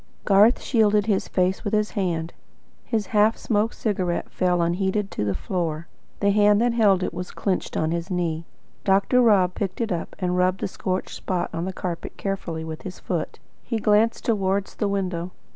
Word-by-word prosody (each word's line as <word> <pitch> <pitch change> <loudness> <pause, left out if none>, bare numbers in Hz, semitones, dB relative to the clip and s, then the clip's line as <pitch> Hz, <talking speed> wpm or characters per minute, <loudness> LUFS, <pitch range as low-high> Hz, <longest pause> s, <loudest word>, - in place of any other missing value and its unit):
Garth 205 +4 +5
shielded 210 -4 +3
his 205 -3 0
face 185 0 0
with 215 -1 0
his 210 0 +1
hand. 170 -5 -2 0.5
His 220 -3 -1
half 215 +1 +4
smoked 220 0 0
cigarette 185 -5 -2
fell 180 -1 +1
unheeded 190 +4 0
to - - -2
the 100 -2 -1
floor. 165 - -2 0.4
The 200 0 +4
hand 205 0 +4
that 240 +1 +2
had 235 - 0
held 195 -3 +4
it - - -2
was 180 0 -5
clenched 190 -3 -2
on 160 0 0
his 170 +2 -3
knee. 170 -3 -2 0.4
Dr. 200 +6 +3
Rob 195 -6 +4
picked 190 -2 -3
it 230 -3 -1
up, 170 -2 -3
and 180 -2 -1
rubbed 185 +1 +1
the - - 0
scorched 185 0 -3
spot 180 -2 -2
on 165 +1 -2
the 190 - -2
carpet 180 -2 -5
carefully 180 -5 -3
with 160 -1 -6
his 185 - -7
foot. - - -3 0.3
He 230 - -2
glanced 215 +1 +2
towards 195 -3 0
the 210 - -1
window. 185 -3 -2
190 Hz, 190 wpm, -24 LUFS, 180-210 Hz, 0.5 s, Garth